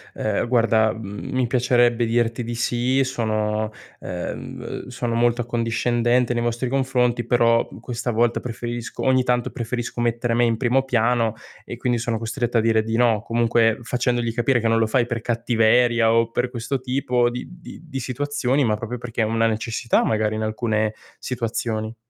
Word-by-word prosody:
"Ehm, 110 +2 -1
guarda, 115 -3 +3
mhmm, 105 +2 -7
mi 130 -2 +1
piacerebbe 120 -1 +2
dirti 115 +1 0
di 120 +1 -4
sì, 125 +3 +1
sono, 110 -3 -1 0.3
uhm, 90 +6 -6
sono 120 -2 -3
molto 120 +1 +2
accondiscendente 120 +1 +1
nei 120 0 -1
vostri 120 +2 -1
confronti, 125 -2 +1
però 115 -1 +3
questa 120 0 -3
volta 115 +1 +1
preferisco 120 0 -5
ogni 130 -1 +4
tanto 125 -1 0
preferisco 120 -1 -4
mettere 120 0 0
me 120 +1 +3
in 115 -2 +2
primo 130 +1 +2
piano 115 -3 +1 0.3
e 120 - -8
quindi 120 -1 0
sono 115 -1 -1
costretta 120 +1 -2
a - - +4
dire 110 -1 +2
di 115 +1 -2
no". 115 -4 +3
Comunque 115 -1 +2
facendogli 120 -1 -1
capire 120 +1 +2
che 115 - 0
non 115 0 +3
lo 115 - +3
fai 120 +1 +2
per 120 -2 -3
cattiveria 120 0 +3
o 115 0 +2
per 125 +1 -1
questo 125 +2 -3
tipo 125 -2 +1
di 125 +1 -6
di 175 -1 -12
di 135 -5 -6
situazioni, 140 +1 0
ma 105 -1 +2
proprio 115 +3 -5
perché 115 -1 -4
è - - +3
una 115 +1 +1
necessità 115 +1 0
magari 110 -1 0
in 110 - -3
alcune 110 0 -1 0.2
situazioni. 115 -2 -3
120 Hz, 170 wpm, -22 LUFS, 115-125 Hz, 0.3 s, ogni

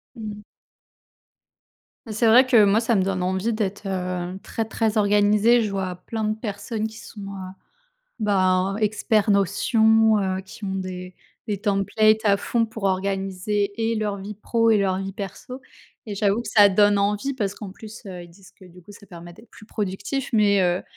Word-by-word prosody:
Mmh. 210 -2 -7 1.7
C'est 220 +2 +1
vrai 245 +4 +7
que 235 -5 +5
moi 205 +3 +3
ça 230 0 +1
me - - +2
donne 185 -1 -2
envie 190 +5 -1
d'être, 205 -2 -3
heu, 180 -1 -3
très 225 - -3
très 220 0 -1
organisée, 210 +3 +4
je 210 - -3
vois 190 -2 -3
plein 220 +5 -5
de 215 0 0
personnes 215 0 -4
qui 220 0 -7
sont, 210 - -11
heu, 195 -2 -7 0.7
ben 190 -2 +1
expert 215 0 +1
notion, 220 +3 +3
heu, 190 -1 -1
qui 200 +3 -11
ont 190 -1 -3
des 185 -1 -6 0.3
des 210 -2 -2
templates 215 +2 +2
à 200 -1 +4
fond 230 +3 -1
pour 220 -1 -10
organiser 195 +1 -1
et 225 +1 0
leur 210 -2 -2
vie 205 +2 -7
pro 230 +2 0
et 220 - +5
leur 190 -2 +1
vie 195 0 -5
perso 250 +6 -8 0.4
et 210 - -6
j'avoue 205 +3 +1
que - - -8
ça 205 -3 +6
donne 205 +1 +3
envie 210 +7 0
parce 205 -6 -3
qu'en 205 -3 -8
plus, 215 +3 -11
heu, 180 -3 -8
ils - - -15
disent 185 +2 -18
que 190 - -17
du 180 0 -16
coup 205 - -14
ça 205 - -15
permet 175 -1 -11
d'être 225 +6 -18
plus - - -15
productif. 210 +6 -4
Mais 205 -2 +4
heu, 175 0 +1
205 Hz, 185 wpm, -23 LUFS, 190-220 Hz, 1.7 s, vrai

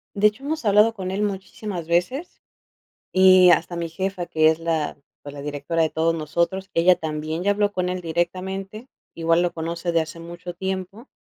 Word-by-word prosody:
De 205 - +2
hecho, 215 +6 -4
hemos 310 -3 -3
hablado 210 +2 +5
con 185 -3 -4
él 195 +2 -2
muchísimas 190 -3 -4
veces 180 - -1 0.7
y 185 -1 +7
hasta 170 0 +2
mi 170 -1 -3
jefa, 185 +1 -3
que 155 -1 +3
es 160 - -1
la 165 -3 -2 0.2
pues, 145 - -9
la 145 - -8
directora 145 +3 -2
de 160 - +1
todos 165 +1 +1
nosotros, 170 +5 -1
ella 175 +2 +5
también 155 +1 -4
ya 205 - +4
habló 205 0 +1
con 180 -2 -1
él 180 0 -2
directamente, 190 +6 -3 0.3
igual 165 +1 +2
lo 175 - 0
conoce 170 +1 -3
de 165 - +3
hace 160 +1 -5
mucho 175 +1 -8
tiempo. 190 +6 -5
175 Hz, 185 wpm, -23 LUFS, 165-195 Hz, 0.7 s, y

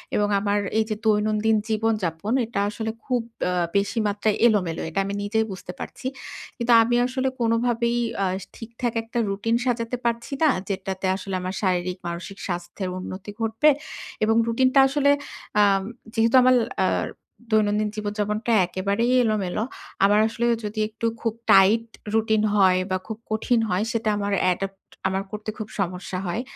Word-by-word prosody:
এবং 205 - +2
আমার 205 0 +1 0.2
এই - - +4
যে, 215 - -1
দৈনন্দিন 215 +1 +2
জীবনযাপন, 215 -3 0
এটা 220 -3 -3
আসলে 220 +1 -3
খুব 250 -3 +1 0.3
আ - - 0 0.3
বেশি 200 +3 0
মাত্রায় 205 +1 0
এলোমেলো 185 -7 +1
এটা 180 +5 -2
আমি 200 - -3
নিজেই 220 +2 +1
বুঝতে 180 -1 -7
পারছি। 255 - -6 0.5
কিন্তু 240 0 +2
আমি 240 +1 +1
আসলে 260 +1 -1
কোনভাবেই 235 0 +1 0.3
আ - - +2 0.3
ঠিকঠাক 230 +1 -4
একটা 230 +1 -6
routine 225 +4 0
সাজাতে 240 0 -1
পারছি 235 +3 -1
না, 310 - +6 0.2
যেটাতে 190 0 -3
আসলে 195 -1 -5
আমার 185 +1 -3
শারীরিক-মানসিক 180 0 -2
স্বাস্থ্যের 175 +1 -4
উন্নতি 190 +2 -7
ঘটবে 225 +7 +3 0.5
এবং 225 +1 +3
routine 255 +3 +2
টা 275 - +8
আসলে 285 0 +2 0.5
আ - - +7 0.5
যেহেতু 230 +1 +3
আমার 255 0 +5 0.3
আ - - +3 0.6
দৈনন্দিন 210 0 +2
জীবনযাপনটা 210 +2 -2 0.2
একেবারেই 200 +6 0
এলোমেলো, 210 -2 0 0.4
আমার 205 +1 +4
আসলে 235 +1 -2 0.2
যদি 215 +1 -4
একটু 225 +1 -5 0.2
খুব 225 -2 0 0.2
tight 210 +4 +6 0.3
routine 220 -1 +2
হয় 185 -2 +5
বা 185 - +2
খুব 220 -1 -5
কঠিন 225 +2 +2
হয়, 185 +3 +1
সেটা 225 -1 0
আমার 200 0 -2 0.2
adopt 195 +1 -6 0.3
আমার 190 +1 -1
করতে 210 0 -5
খুব 215 -1 -5
সমস্যা 180 0 -3
হয়। 215 +7 -1
215 Hz, 155 wpm, -24 LUFS, 195-230 Hz, 0.6 s, টা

